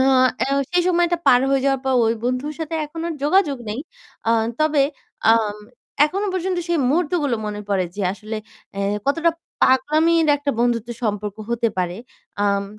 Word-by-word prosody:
আ - - +5 0.7
সেই 355 0 +3
সময়টা 345 -1 +2
পার 250 -2 +7
হয়ে 270 -1 +2
যাওয়ার 270 -1 +2
পর 265 0 +1
ওই 225 - +2
বন্ধুর 255 +5 -1
সাথে 320 0 -3
এখন 325 +2 -8
আর 335 - -3
যোগাযোগ 300 -3 +2
নেই। 220 +5 -3 0.5
আ - - +4 0.3
তবে 310 -2 +3 0.5
আম 215 -2 +1 0.5
এখনো 390 +7 -2
পর্যন্ত 370 0 -1
সেই 340 -1 +1
মুহূর্তগুলো 300 -4 +1
মনে 210 0 -4
পড়ে 195 -2 +1
যে 205 - -2
আসলে 215 +2 -6 0.4
এ - - -1 0.3
কতটা 330 +4 +3 0.3
পাগলামির 310 +5 +3
একটা 290 0 -2
বন্ধুত্বের 240 -1 0
সম্পর্ক 210 -1 -2
হতে 235 0 +1
পারে। 180 -1 -1 0.5
আম 200 0 +1
275 Hz, 160 wpm, -21 LUFS, 225-330 Hz, 0.7 s, পার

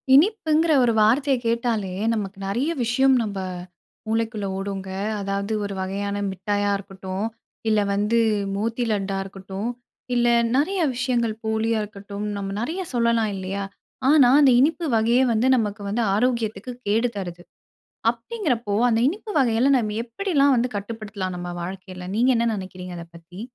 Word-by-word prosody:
இனிப்புங்குற 320 -2 +4
ஒரு 235 -1 +3
வார்த்தைய 265 +6 +4
கேட்டாலே, 230 -4 0 0.2
நமக்கு 200 -3 -3
நிறைய 245 +10 0
விஷயம் 265 +3 +3
நம்ப 200 -3 -4 0.7
மூளைக்குள்ள 220 -1 -1
ஓடுங்க. 195 -1 -4 0.3
அதாவது 200 +2 -2
ஒரு 200 -1 -3
வகையான 200 +2 -2
மிட்டாயா 205 +2 -1
இருக்கட்டும். 195 0 -5 0.4
இல்ல 215 -1 +3
வந்து 210 +3 +2 0.4
மோத்தி 230 +4 -1
லட்டா 195 -2 -1
இருக்கட்டும். 195 +2 -6 0.4
இல்ல 240 0 +3 0.3
நிறைய 355 +8 +1 0.2
விஷயங்கள் 240 -3 0
போலியா 220 +1 +1
இருக்கட்டும். 200 0 -7
நம்ம 195 0 -4
நிறையா 330 +10 -2
சொல்லலாம் 235 -2 +2
இல்லையா? 190 +1 -3 0.5
ஆனா, 285 -4 +7
அந்த 275 -3 +6
இனிப்பு 325 +5 +2
வகையே 235 +3 +3
வந்து, 225 +3 +2
நமக்கு 210 -2 -2
வந்து 225 +4 0
ஆரோக்கியத்துக்கு 235 +1 0 0.2
கேடுதருது. 205 -6 -1 0.7
அப்படிங்குறப்போ, 255 - -2
அந்த 225 -1 +2
இனிப்பு 420 +7 -5
வகைகள 245 +1 +3
நம்ம 215 -4 -1
எப்படிலாம் 280 - +2
வந்து 240 +2 +1
கட்டுப்படுத்தலாம்? 205 -3 -5
நம்ம 175 0 -5
வாழ்க்கைல 185 0 -7
நீங்க 245 +3 +4
என்ன 235 0 +2
நினைக்கிறீங்க? 185 -1 -7
அத 170 - -7
பத்தி. 170 +3 -12
220 Hz, 135 wpm, -23 LUFS, 195-245 Hz, 0.7 s, ஆனா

